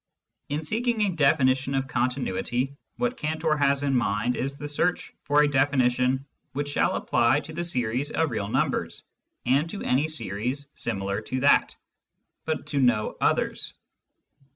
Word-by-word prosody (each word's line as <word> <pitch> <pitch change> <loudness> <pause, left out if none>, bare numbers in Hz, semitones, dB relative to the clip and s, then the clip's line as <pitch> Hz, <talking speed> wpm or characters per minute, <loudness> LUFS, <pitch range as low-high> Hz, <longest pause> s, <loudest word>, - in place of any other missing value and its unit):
In 150 +2 -2
seeking 230 +7 0
a 205 - +3
definition 135 -3 +3
of 135 0 0
continuity, 125 +1 -1 0.2
what 245 0 -1
Cantor 155 0 0
has 140 -1 +2
in 140 -2 +1
mind 115 +1 +1
is 135 +2 -3
the 145 - -5
search 160 +5 -1
for 145 +1 +4
a - - +4
definition 130 -1 +2 0.3
which 145 +2 -2
shall 145 - +1
apply 120 +5 +2
to 160 - -9
the 170 +2 -3
series 125 -3 -1
of 160 -4 0
real 105 -3 -2
numbers - - -1 0.4
and 140 +6 +2
to 200 - -5
any 135 +5 +2
series 135 0 -3
similar 100 -2 -2
to 130 +4 -3
that, 145 - +4 0.7
but 160 -1 -2
to 145 - -2
no 120 -5 +2
others. - - 0
140 Hz, 155 wpm, -26 LUFS, 125-150 Hz, 0.7 s, for